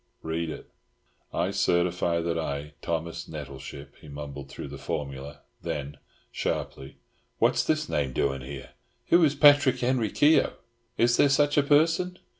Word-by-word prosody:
"Read 80 +1 -2
it." - - -8 0.6
"I - - -1
certify 85 -1 +1
that 85 0 -1
I, 75 -2 -4
Thomas 85 0 -3
Nettleship," 70 -1 -8
he 80 - -13
mumbled 70 -1 -8
through 70 - -8
the 70 0 -9
formula, 70 +1 -5 0.2
then, 70 0 -4 0.3
sharply 65 - -4 0.4
"What's - - +3
this 155 -1 0
name 70 -3 -1
doing 70 +1 -1
here? 65 +1 -8 0.4
Who 170 0 +6
is 145 -2 +3
Patrick 145 -3 +6
Henry 120 -3 +1
Keogh? 150 +8 +4 0.4
Is 120 0 +3
there 145 - +5
such 145 +1 +3
a 145 - +5
person?" 165 +5 +2
80 Hz, 145 wpm, -27 LUFS, -, 0.6 s, Who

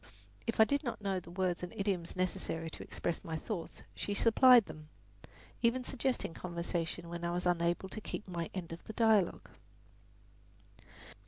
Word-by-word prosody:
If 230 - -2
I - - +11
did 285 +6 +1
not 235 -5 -3
know 195 -2 0
the 170 - -13
words 180 0 -1
and 180 - -5
idioms 190 -4 -1
necessary 165 -3 -2
to - - -8
express 170 - -3
my 165 -3 -3
thoughts 175 -1 -5
she 205 - -2
supplied 240 +1 +7
them, 155 0 -10 0.7
even 250 +2 +2
suggesting 255 -8 -1
conversation 170 -1 -3
when 170 0 -6
I 170 - 0
was 175 +1 -1
unable 175 +1 +1
to 215 - -5
keep 210 - -5
up 185 - -8
my 170 -1 -2
end 175 -3 -4
of 165 - -9
the 220 - -7
dialogue. 220 -5 +3
180 Hz, 170 wpm, -34 LUFS, 170-220 Hz, 0.7 s, I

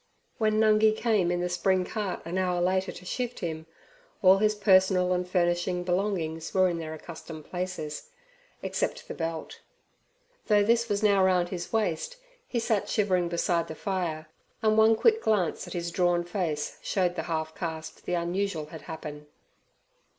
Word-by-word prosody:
When 215 -1 +2
Nungi 215 0 +4
came 215 -7 +2
in 175 0 0
the 180 - 0
spring 180 +1 +1
cart 210 -3 -3
an 175 +3 -2
hour 180 -1 +1
later 185 +2 +1
to 180 - -12
shift 245 +4 -3
him, 160 -2 -4 0.6
all 190 +1 +7
his 215 0 +2
personal 190 -3 +4
and 180 0 -2
furnishing 175 0 +1
belongings 175 -3 -1
were 185 -1 +5
in 170 -2 -2
their 160 -1 -5
accustomed 160 -1 -9
places, 180 - -4 0.5
except - - -2
the - - -5
belt. 165 -1 -5 0.9
Though 210 -2 +5
this 230 +2 +2
was 205 +1 0
now 200 -2 +5
round 180 -2 +3
his 175 -2 -5
waist, 220 - -1 0.3
he 245 - -3
sat 225 -3 0
shivering 185 -5 +1
beside 170 0 0
the 160 - -7
fire, 170 -5 -2 0.4
and 215 0 +4
one 220 +1 +6
quick 445 - +3
glance 200 -7 0
at - - -7
his 170 -1 -3
drawn 175 0 +2
face 170 -4 -3
showed 180 -3 0
the - - -3
half 160 -1 -2
caste 160 -2 -6
the 180 - +1
unusual 175 -1 -1
had 160 - -8
happened. 150 -2 -8
180 Hz, 165 wpm, -28 LUFS, 170-205 Hz, 0.9 s, all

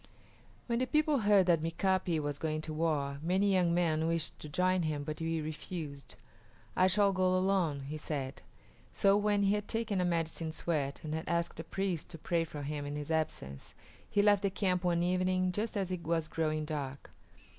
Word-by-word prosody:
When 235 -1 0
the 255 - 0
people 305 -1 +2
heard 205 -3 +5
that 170 -3 +3
Mika´pi 175 +1 +1
was 145 -1 -3
going 155 -1 -1
to 155 0 -5
war 150 -3 0
many 190 +4 +2
young 180 -2 +3
men 165 -2 +2
wished 165 -1 -1
to 150 - -8
join 185 +4 +2
him, 155 -3 -1
but 155 +1 -5
he 165 0 -1
refused. 155 -2 -6 0.6
"I 185 - +5
shall 200 +1 +3
go 185 0 +2
alone," 185 -6 +1
he 145 +3 -5
said. 140 -3 -4 0.5
So 195 0 +4
when 205 0 +2
he 200 0 +3
had 210 0 -2
taken 225 -4 -1
a - - +2
medicine 165 -2 -1
sweat 150 -4 -2
and 155 -1 -4
had 160 +1 -3
asked 170 -1 -1
a - - -3
priest 185 -1 -2
to 165 - -8
pray 165 +1 0
for 150 -2 -7
him 145 0 -3
in 145 - -4
his 150 +1 -4
absence, 110 - -3 0.3
he 205 - +3
left 205 -1 +5
the 200 - +1
camp 185 -1 0
one 175 -1 +2
evening, 185 +1 +1
just 210 +4 -2
as 190 -2 -1
it 180 -2 -3
was 165 -1 0
growing 155 -1 -1
dark. 140 -3 -5
170 Hz, 200 wpm, -32 LUFS, 155-190 Hz, 0.6 s, heard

